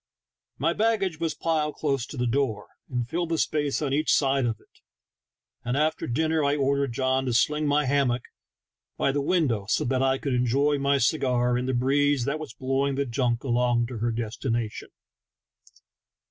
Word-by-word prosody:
My 165 +5 +1
bag 225 +2 +1
gage 180 -5 -2
was 165 -1 -1
piled 155 -2 -1
close 135 -5 -1
to 145 - -9
the 125 - 0
door 120 -3 -1 0.2
and 125 -2 -2
filled 170 +5 -2
the 165 - 0
space 150 -1 0
on 135 -2 -1
each 155 +2 +1
side 135 -3 +2
of 110 -2 -3
it, - - -28 0.8
and 120 +2 -1
after 155 +1 0
dinner 155 +5 +1
I 140 0 +2
ordered 140 -2 0
John 130 +1 0
to 125 - 0
sling 150 +5 +2
my 145 0 +2
hammock 130 -3 +1 0.7
by 135 - +1
the 145 +1 -1
window 140 - 0
so 150 - +1
that 130 0 0
I 135 0 +2
could 135 -1 -3
enjoy 135 +4 +2
my 140 0 +2
cigar 125 -2 +1
in 125 +1 -1
the 130 - 0
breeze 140 +1 +2
that 140 +3 -1
was 155 -7 -8
blowing 135 +1 0
the 140 +1 0
junk 120 -1 -1
along 120 -2 +1
to 120 -3 -6
her 120 +2 0
destination. 115 0 -3
135 Hz, 185 wpm, -26 LUFS, 125-150 Hz, 0.8 s, side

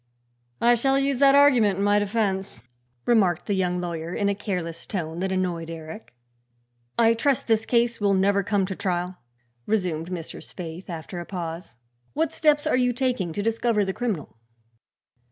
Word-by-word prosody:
"I 240 +1 +5
shall 270 +3 +2
use 275 -2 +1
that 275 0 +6
argument 245 -9 +5
in 200 - 0
my 205 0 +4
defense," 195 - -2 0.4
remarked 190 -8 +3
the 205 - -1
young 180 -2 0
lawyer 170 -1 -4
in 200 -1 +1
a - - +2
careless 180 -5 -4
tone 165 -4 -4
that 190 +1 -1
annoyed 175 -3 -2
Eric. 160 - -9 0.8
"I 230 -1 +5
trust 265 +3 +1
this 225 -1 +1
case 235 -1 +1
will 200 -1 +3
never 200 +1 +3
come 200 0 +1
to 190 0 -5
trial," 180 0 -2 0.5
resumed 180 -6 -1
Mr. 170 -3 -6
Spaythe 175 +1 -8
after 170 +1 -6
a 175 - -6
pause. 170 -6 -6 0.4
"What 320 +2 0
steps 300 -1 +2
are - - +2
you 250 -1 +2
taking 245 -8 -1
to 205 +5 -3
discover 225 -1 +1
the 190 - -2
criminal?" 200 - -4
195 Hz, 170 wpm, -25 LUFS, 175-230 Hz, 0.8 s, that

